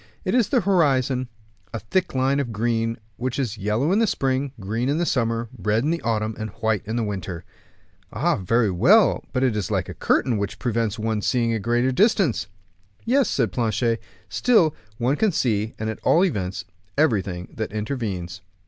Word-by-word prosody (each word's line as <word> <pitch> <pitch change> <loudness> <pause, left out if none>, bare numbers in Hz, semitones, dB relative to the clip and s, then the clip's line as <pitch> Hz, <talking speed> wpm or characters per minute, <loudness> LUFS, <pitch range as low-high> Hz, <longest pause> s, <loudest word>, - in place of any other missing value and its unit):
"It 185 - 0
is 245 -5 +3
the - - +3
horizon, 135 -9 +2 0.5
a - - -2
thick 180 - -1
line 135 +2 +2
of 130 -5 -2
green, 115 +1 0 0.2
which 125 0 -3
is 115 -6 -2
yellow 105 - 0
in 200 - +3
the 225 - +3
spring, 135 -4 0
green 110 +6 -2
in 145 - +1
the 175 - +1
summer, 115 -4 0
red 110 +2 0
in 150 - +1
the 170 - -1
autumn, 110 -1 -1
and 110 0 -3
white 110 -2 +1
in 110 - -2
the 120 - 0
winter." 95 -4 -4 0.7
"All - - +1
very 110 +2 +1
well, 180 - +4
but 130 -1 0
it 125 -4 +2
is 105 -3 -2
like - - -1
a - - -5
curtain, 120 -4 +1
which 100 -1 -3
prevents 115 -3 -1
one 110 -1 -1
seeing 115 +1 +1
a 110 - 0
greater 120 +4 +1
distance." 190 - +2 0.6
"Yes," 265 +3 +3
said 115 -7 0
Planchet; 115 +1 0 0.3
"still, 190 -11 +3 0.2
one 125 +4 +1
can 220 -2 +2
see, 110 - 0
at 110 0 -4
all 175 +4 +4
events, 95 - -3 0.3
everything 100 - +1
that 110 - -3
intervenes." 105 -6 -4
115 Hz, 185 wpm, -23 LUFS, 110-140 Hz, 0.7 s, well